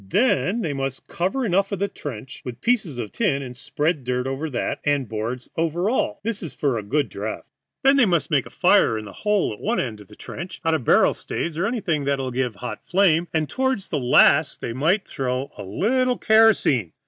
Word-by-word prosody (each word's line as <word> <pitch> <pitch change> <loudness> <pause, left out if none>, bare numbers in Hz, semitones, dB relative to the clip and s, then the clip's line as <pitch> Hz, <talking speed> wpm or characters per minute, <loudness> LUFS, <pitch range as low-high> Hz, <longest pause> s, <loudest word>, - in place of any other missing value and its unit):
Then 215 - +2
they 160 -7 -2
must 135 -1 -4
cover 195 +10 -1
over 195 0 +1
the 200 +2 -1
trench 130 - -8
with 125 0 -7
pieces 210 - 0
of 115 -4 -5
tin 145 -12 0
and 125 -1 -8
spread 150 +3 -1
dirt 125 0 -1
over 135 +4 -3
that, 130 - -2
and 145 -4 +1
boards 115 +4 -4
over 170 +5 0
all; 260 - -1
this 225 -1 -2
is 165 -7 -7
for 140 -4 0
a 110 - -2
good 140 +7 0
draught. 105 +2 -5 0.4
Then 275 +1 +5
they 250 -6 +5
must 170 -5 +1
make - - +2
a - - -11
fire 110 - +3
in 110 - -6
the 100 - -10
hole 210 - 0
at 105 - -11
one 235 +3 0
end 110 -5 -3
of 100 - -15
the 105 - -15
trench 175 - -8
out 165 - +3
of 145 -7 -1
barrel - - +5
staves 165 -2 -4
or 175 +5 0
anything 190 - -1
that 140 0 +1
will 130 -1 -3
give 125 -3 -1
a - - -19
hot 120 -4 -6
flame, 175 -3 +3
and 155 -2 0
toward 260 - 0
the 160 -5 -2
last 140 +4 +4
they 115 - -4
might 165 - +1
throw 125 -1 -2
on 135 - -6
a - - -5
little 250 - +1
kerosene. 220 - +4
150 Hz, 225 wpm, -23 LUFS, 125-200 Hz, 0.4 s, Then